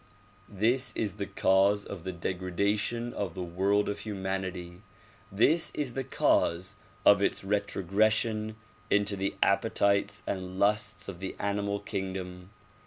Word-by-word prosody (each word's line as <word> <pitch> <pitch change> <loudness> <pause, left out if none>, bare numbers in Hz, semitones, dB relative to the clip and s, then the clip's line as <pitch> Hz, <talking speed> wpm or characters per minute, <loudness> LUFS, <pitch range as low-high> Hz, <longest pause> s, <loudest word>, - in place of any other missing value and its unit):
This 115 +5 +1
is 105 -2 -2
the 100 -2 -3
cause 100 +1 +3
of 95 -4 -7
the 95 - -2
degradation 100 +7 -1
of 95 -5 -3
the 90 - -3
world 95 +4 +1
of 105 0 -3
humanity. 95 -3 -4 0.5
This 155 - +3
is 140 -5 -2
the 135 - -2
cause 95 -6 +1 0.3
of - - +7
its - - +1
retrogression 105 +2 +1 0.3
into 100 0 +2
the 95 0 -2
appetites 100 +1 +2
and 95 -1 -4
passions 105 -1 +1
of 90 -3 -7
the 95 0 -5
animal 100 0 -1
kingdom. 95 -2 -5
100 Hz, 130 wpm, -29 LUFS, 95-105 Hz, 0.5 s, of